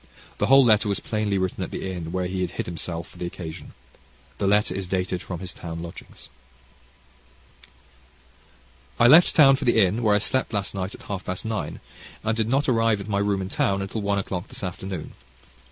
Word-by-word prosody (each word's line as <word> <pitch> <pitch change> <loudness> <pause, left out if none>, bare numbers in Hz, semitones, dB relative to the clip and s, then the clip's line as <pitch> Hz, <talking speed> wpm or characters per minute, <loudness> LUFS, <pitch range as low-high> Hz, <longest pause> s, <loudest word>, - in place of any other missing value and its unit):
The 105 - +2
whole 135 +1 +7
letter 110 -2 +4
was 100 - 0
plainly 105 -2 -1
written 95 -1 -2
at - - -5
the 95 - -4
inn 85 -3 -5
where 90 0 -1
he 90 +1 -3
had 90 - -1
hid - - -2
himself 85 0 -5
for - - -16
the 90 - -3
occasion. 80 -2 -8 0.7
The 100 - +1
next 105 +1 +3
letter - - -3
is 95 - -5
dated 90 -1 -1
from 90 -2 -6
his 95 -2 -5
town 85 -1 -7
lodgings.) 85 - -11 2.7
I 120 - +6
left 160 +8 +7
town 135 -3 +7
for - - -4
the 120 -2 +4
inn 105 +3 +3
where 105 -3 +3
I - - +5
slept 115 +3 0
last 100 -1 -2
night 95 0 -4
at - - -15
half 95 -2 -5
past 90 +4 -4
nine, 110 -2 -4 0.4
and 110 0 0
did 110 -1 0
not 135 +3 +1
arrive 115 -4 +2
at 100 - -7
my 100 -1 +1
room 100 -1 0
in 95 - -6
town 100 0 +1
until 100 +3 -4
one 100 0 0
o'clock 95 -2 -3
this - - -8
afternoon. 90 -1 -5
100 Hz, 210 wpm, -24 LUFS, 90-110 Hz, 2.7 s, whole